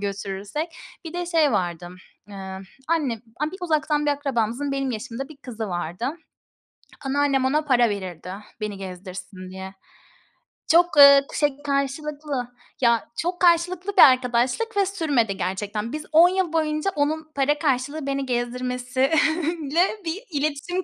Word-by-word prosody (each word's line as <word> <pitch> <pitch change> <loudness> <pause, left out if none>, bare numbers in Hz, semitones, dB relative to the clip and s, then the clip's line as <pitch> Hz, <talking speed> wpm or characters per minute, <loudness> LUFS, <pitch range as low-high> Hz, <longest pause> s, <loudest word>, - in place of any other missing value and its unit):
götürürsek. 200 - -4 0.4
Bir 325 - -7
de 350 0 -3
şey 320 -5 +3
vardı, 175 -3 -2 0.4
eee, 190 -1 -7 0.3
anne 285 -10 0 0.4
uzaktan 305 -3 0
bir - - +3
akrabamızın 275 -1 -1
benim 275 -1 -1
yaşımda 240 +4 -5
bir 310 - -13
kızı 230 -6 -6
vardı. 175 +5 -3 1.0
Anneannem 275 -1 +1
ona 295 +4 +2
para 250 -6 +3
verirdi, 185 -3 -5 0.3
beni 210 -2 -3
gezdirsin 185 0 -8
diye. 190 +1 -8 0.9
Çok, 345 +2 +5
eee, 280 -1 +10 0.2
şey, 290 -2 +1
karşılıklı, 280 -1 -2 0.3
ya 235 -2 +2
çok 355 +2 -2
karşılıklı 360 +3 +2
bir - - +9
arkadaşlık 255 - +4
ve 395 - +4
sürmedi 285 - 0
gerçekten. 205 +4 -3
Biz 305 0 -4
10 335 +3 +7
yıl 370 -3 -1
boyunca 310 +3 0
onun 310 +2 -1
para 290 +2 +1
karşılığı 280 +1 -1
beni 275 0 -1
gezdirmesiyle 265 +6 0 0.2
bir 345 +8 -3
iletişim 305 +5 -1
275 Hz, 130 wpm, -24 LUFS, 225-310 Hz, 1.0 s, eee